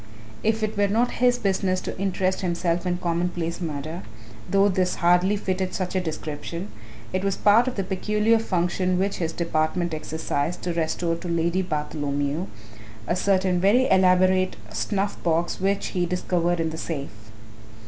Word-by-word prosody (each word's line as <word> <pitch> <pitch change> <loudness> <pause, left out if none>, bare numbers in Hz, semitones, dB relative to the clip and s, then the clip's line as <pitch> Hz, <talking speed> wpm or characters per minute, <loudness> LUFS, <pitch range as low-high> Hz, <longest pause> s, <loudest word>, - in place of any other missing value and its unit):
If 220 0 +1
it 215 - -1
were 205 0 +3
not 230 +5 +2
his 245 -1 +4
business 190 -3 0
to - - -5
interest 190 -1 0
himself 175 -1 0
in 175 0 0
commonplace 175 -1 -2
murder 155 +1 -4 0.5
though 195 0 +4
this 185 -2 +1
hardly 180 +3 +3
fitted 185 -2 -2
such 185 -1 -2
a 185 - +1
description 165 +3 -5 0.4
it 185 0 0
was 195 -1 0
part 220 +5 +5
of 255 - -2
the 195 - -1
peculiar 210 +4 +1
function 180 -2 0
which 195 +2 0
his 165 -2 -1
department 165 +1 -1
exercised 155 +1 -2
to 175 - -1
restore 165 +1 -1
to 175 - -7
Lady 170 +2 +1
Bartholomew 150 0 -2 0.6
a 170 - 0
certain 185 -1 +2
very 235 +7 +4
elaborate 185 0 +4 0.2
snuff 200 0 -2
box 170 0 0
which 195 +1 0
he 180 -1 -1
discovered 175 -1 0
in 160 -1 0
the 160 - -6
safe. 145 -5 -4
180 Hz, 160 wpm, -24 LUFS, 170-195 Hz, 0.6 s, part